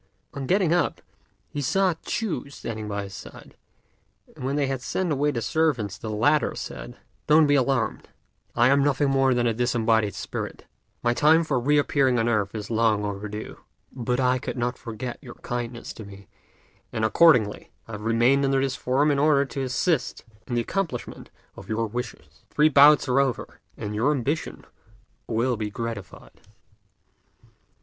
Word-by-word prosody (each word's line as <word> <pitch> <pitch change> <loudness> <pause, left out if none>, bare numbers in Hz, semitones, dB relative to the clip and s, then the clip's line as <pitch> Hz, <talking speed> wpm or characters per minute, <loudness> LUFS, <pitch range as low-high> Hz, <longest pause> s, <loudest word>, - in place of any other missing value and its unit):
On 135 -2 -5
getting 185 -3 +2
up, 175 - +1 0.5
he 145 - -5
saw 185 +6 +2
Ch'u 205 -10 -3
standing 110 -6 -6
by 100 -1 -3
his 100 -1 -9
side; - - -11 0.8
and - - -10
when 135 +2 -1
they 145 -1 +1
had 135 -1 -3
sent 180 +5 -2
away 145 +1 +1
the 120 -6 -2
servants 125 -9 0
the 110 - -7
latter 140 +8 +2
said, - - -7 0.3
"Don't 155 +1 +6
be 145 - +3
alarmed: 135 -1 0 0.5
I 120 +1 +4
am 140 +1 +4
nothing 145 0 +2
more 135 -1 +3
than 120 0 +1
a 115 - +2
disembodied 115 -4 +1
spirit. - - -6 0.4
My 120 0 +2
time 155 +5 +4
for 145 -5 0
re 145 +5 +2
appearing 135 -3 +2
on 115 0 +1
earth 105 -3 0
is 105 +1 -5
long 110 -2 +2
overdue, 105 +1 -6 0.3
but 125 0 -2
I 130 0 +2
could - - -5
not 120 +1 -1
forget 120 +1 -6
your 125 -4 -11
great - - -28
kindness 120 -1 -5
to 110 - -9
me, 100 -1 -13 0.6
and 110 - -1
accordingly 110 -3 +4 0.2
I - - -10
have 105 -1 -6
remained 120 +5 +3
under 135 0 +2
this 135 -1 -1
form 135 +4 +1
in 140 - +1
order 145 -1 +4
to 135 0 -5
assist 135 +4 -1 0.2
in 120 - -3
the 120 - +2
accomplishment 160 - -4 0.3
of - - -12
your 115 +1 0
wishes. 110 - -7
The - - -31
three 150 +1 +5
bouts 145 0 +6
are 130 +1 +3
over, 135 -4 -2 0.2
and 105 - -5
your 115 +7 +1
ambition 145 +3 -3 0.6
will 120 +2 0
be 105 -1 -3
gratified." 115 -3 -7
125 Hz, 175 wpm, -25 LUFS, 115-140 Hz, 0.8 s, Don't